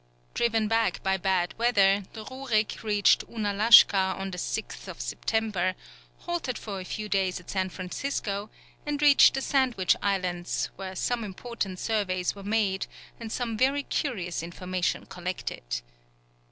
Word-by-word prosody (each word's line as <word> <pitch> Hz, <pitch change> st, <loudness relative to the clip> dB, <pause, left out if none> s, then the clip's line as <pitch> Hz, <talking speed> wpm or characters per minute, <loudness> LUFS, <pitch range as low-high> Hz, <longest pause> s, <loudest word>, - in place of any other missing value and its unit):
Driven 225 Hz, -2 st, +1 dB
back 225 Hz, -4 st, +1 dB
by 190 Hz, 0 st, +2 dB
bad 185 Hz, -1 st, 0 dB
weather, 200 Hz, -4 st, +4 dB
the 220 Hz, -2 st, -8 dB
Rurik 255 Hz, -5 st, -1 dB
reached 205 Hz, -2 st, +3 dB
Ounalashka 205 Hz, -3 st, +5 dB
on 195 Hz, 0 st, -4 dB
the 180 Hz, -, -5 dB
6th -, -, -5 dB
September, 185 Hz, -, -1 dB, 0.5 s
halted 340 Hz, -8 st, -3 dB
for 200 Hz, -3 st, -6 dB
a -, -, -5 dB
few 215 Hz, +3 st, -4 dB
days 190 Hz, -3 st, 0 dB
at 180 Hz, -, -10 dB
San 190 Hz, -1 st, 0 dB
Francisco, 200 Hz, +2 st, -4 dB, 0.3 s
and 295 Hz, -1 st, -2 dB
reached 290 Hz, -2 st, +7 dB
the 270 Hz, -, -1 dB
Sandwich 250 Hz, -9 st, +2 dB
Islands, 180 Hz, -3 st, -1 dB
where 190 Hz, 0 st, -7 dB
some 240 Hz, +5 st, -1 dB
important 200 Hz, -1 st, -5 dB
surveys 185 Hz, -4 st, -1 dB
were 200 Hz, -, -11 dB
made 200 Hz, -2 st, 0 dB, 0.3 s
and 225 Hz, -2 st, -7 dB
some 235 Hz, -2 st, -2 dB
very 275 Hz, +5 st, +2 dB
curious 190 Hz, -, -2 dB
information 180 Hz, +1 st, -2 dB
collected. 180 Hz, 0 st, -5 dB
200 Hz, 140 wpm, -27 LUFS, 185-230 Hz, 0.5 s, reached